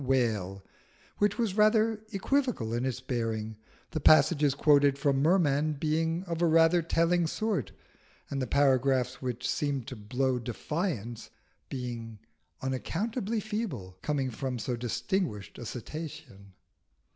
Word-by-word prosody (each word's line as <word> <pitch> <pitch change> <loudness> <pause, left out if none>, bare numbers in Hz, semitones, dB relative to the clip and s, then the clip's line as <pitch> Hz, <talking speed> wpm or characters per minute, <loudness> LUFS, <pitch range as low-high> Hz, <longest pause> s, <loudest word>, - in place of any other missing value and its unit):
Whale 110 -8 0 0.6
which 205 +1 +2
was 225 -6 0
rather 215 0 +3
equivocal 220 - 0
in 120 +2 0
its 130 -1 -2
bearing, 115 -4 -3 0.3
the 155 - -2
passages 145 -1 +5
quoted 145 -1 +4
from 140 -1 +1
Merman 155 -2 +3
being 160 +3 0
of 170 -3 -4
rather 165 +1 +5
a - - -2
telling 165 +1 +2
sort, 215 +3 -1 0.6
and 135 -1 -3
the 130 - -1
paragraphs 130 -2 +2
which 125 -1 -3
seemed 140 -4 -1
to 130 - -6
blow 125 +4 -1
defiance 120 - -3 0.4
being 120 -4 -5 0.5
unaccountably 210 - -2
feeble, 210 - -4
coming 140 -4 -1
from 125 +2 -3
so 120 +2 -2
distinguished 120 - -2
a 120 - -6
Cetacean. 140 - -8
140 Hz, 125 wpm, -29 LUFS, 125-170 Hz, 0.6 s, passages